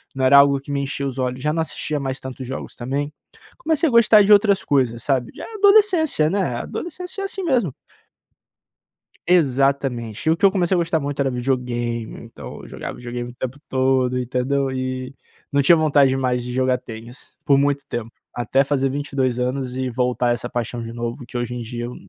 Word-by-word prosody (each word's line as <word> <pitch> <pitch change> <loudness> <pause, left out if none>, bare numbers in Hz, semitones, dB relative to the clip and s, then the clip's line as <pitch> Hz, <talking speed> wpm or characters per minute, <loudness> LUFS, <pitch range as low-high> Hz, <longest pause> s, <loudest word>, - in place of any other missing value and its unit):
Não 130 -1 0
era 140 +2 +7
algo 140 0 +6
que 140 +1 -9
me 140 0 0
enchia 140 0 -3
os 135 -1 -6
olhos, 125 0 -2
já 150 +2 0
não 165 - 0
assistia 155 -2 -3
mais 135 -1 -3
tantos 130 0 -7
jogos 135 - -6
também. 140 +4 -3 0.4
Comecei 325 - +1
a - - 0
gostar 225 -2 +6
de 205 +1 +6
outras 200 -1 +4
coisas, 120 -5 +1
sabe? 130 -4 0
Já - - -7
adolescência, 395 - +4
né? 200 +3 0 0.2
A - - -3
adolescência 360 +3 -6
é - - -2
assim 390 -1 -4
mesmo. 245 - +1 1.6
Exatamente, 135 - +1
o 160 - +4
que 200 - -15
eu 195 - +6
comecei 185 -2 +1
a - - +2
gostar 165 -1 +1
muito 145 0 -4
era 135 -1 +2
videogame, 120 -2 -2
então - - -10
eu - - -12
jogava - - -7
videogame 120 0 -5
o - - -19
tempo 130 +1 -5
todo, 130 -1 +1
entendeu? 130 +2 -1
E, 130 0 -4 0.4
não 140 - +3
tinha 155 +5 +6
vontade 145 -4 +3
mais 125 -2 0
de 125 - -6
jogar 130 0 +2
tênis, 115 +2 -12
por 140 - +5
muito 140 0 +1
tempo, 115 -1 -5 0.2
até 130 +3 +1
fazer 135 -1 0
22 135 -3 -1
anos 125 0 -2
e 130 0 -2
voltar 125 0 +1
essa 120 0 -5
paixão 120 0 -3
de 115 - -6
novo, 120 +2 -5
que 125 - -6
hoje 120 0 -3
em 120 - -4
dia 120 +1 -5
eu 125 - -7
135 Hz, 200 wpm, -21 LUFS, 125-150 Hz, 1.6 s, era